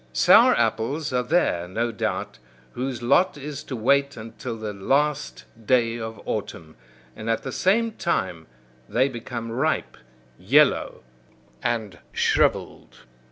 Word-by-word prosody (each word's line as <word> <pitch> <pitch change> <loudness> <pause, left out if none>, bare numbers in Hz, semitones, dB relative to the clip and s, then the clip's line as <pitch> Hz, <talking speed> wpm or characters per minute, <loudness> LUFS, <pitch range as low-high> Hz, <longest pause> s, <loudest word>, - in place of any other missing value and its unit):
Sour 60 - +6
apples 120 +6 -1
are 125 - +2
there, 125 - +1
no 115 +6 -2
doubt, 110 - -3 0.3
whose 125 -1 -4
lot 145 +8 +3
is 145 0 -7
to 130 - -5
wait 140 +4 +2
until 115 +1 -7
the 110 -1 -5
last 145 +9 -1 0.2
day 120 0 +2
of 110 -2 -6
autumn: 80 -1 -5 0.4
and 110 - -6
at 115 - 0
the - - -5
same 225 +5 +2
time 90 - -2 0.4
they 130 +3 +2
become 120 -2 -6
ripe, 120 - -1 0.4
yellow, - - +3 0.6
and 110 -8 -2
shrivelled. 60 0 0
120 Hz, 125 wpm, -24 LUFS, 110-140 Hz, 0.6 s, Sour